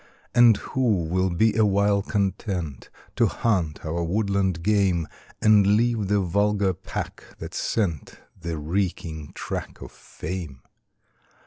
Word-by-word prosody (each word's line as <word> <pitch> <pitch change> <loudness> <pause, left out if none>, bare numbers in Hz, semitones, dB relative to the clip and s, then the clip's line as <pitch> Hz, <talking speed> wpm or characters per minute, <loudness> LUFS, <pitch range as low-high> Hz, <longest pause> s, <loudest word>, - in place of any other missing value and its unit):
And 120 -3 +6
who 115 -9 0
will 95 +3 0
be 105 +5 +2
awhile 100 -1 +3
content 95 - -2 0.3
To - - +4
hunt 90 -11 -1
our 85 +2 -2
woodland 95 -1 0
game, 95 -5 +2 0.4
And 105 -1 +5
leave 115 -3 +1
the 100 0 +2
vulgar 100 +1 +1
pack 90 +1 -6
that - - -8
scent 90 -10 -2 0.2
The 85 -1 -5
reeking 80 -2 -3
track - - -5
of - - -9
fame? 80 -7 -7
95 Hz, 120 wpm, -25 LUFS, 85-105 Hz, 0.4 s, And